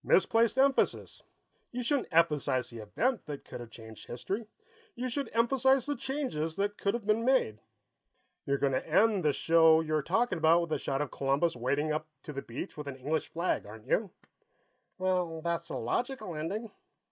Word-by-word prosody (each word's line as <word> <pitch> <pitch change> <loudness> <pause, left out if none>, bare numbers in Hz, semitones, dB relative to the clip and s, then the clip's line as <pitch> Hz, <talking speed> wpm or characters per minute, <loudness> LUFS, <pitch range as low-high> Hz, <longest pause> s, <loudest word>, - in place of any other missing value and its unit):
"Misplaced 225 +5 +3
emphasis. 270 0 +2 0.5
You 250 0 -3
shouldn't 280 +1 0
emphasize 150 -7 +2
the 115 - -8
event 215 - -1
that 145 -2 -6
could - - -8
have 120 -1 -8
changed 110 -1 -12
history; 195 - -4 0.5
you 255 +1 -3
should 275 +3 -3
emphasize 265 +3 +3
the 290 0 -1
changes 260 - -3
that 205 +2 -1
could 200 +2 0
have 235 -3 -5
been 215 +2 +2
made. 240 - +2 0.9
You're 140 0 +2
going 140 -1 +1
to 130 - -1
end 195 +3 +4
this 150 -2 +2
show 160 -1 +5
you 155 -1 -2
were 155 - +2
talking 225 +2 +1
about 165 +2 +5
with 170 -2 -4
a - - 0
shot 135 +1 -1
of 145 - -7
Columbus 140 +4 +1
wading 140 +5 0
up 155 0 -2 0.2
to 150 - -7
the 140 - -4
beach 130 +11 -7
with 150 -1 -6
an 140 - -5
English 145 +5 -2
flag, 170 - -1
aren't 110 +1 -11
you?" 200 - +1 0.9
"Well, 180 -3 0
that's 170 0 -2
the - - -4
logical 220 - -2
ending." 195 +9 -4
170 Hz, 185 wpm, -30 LUFS, 140-230 Hz, 0.9 s, show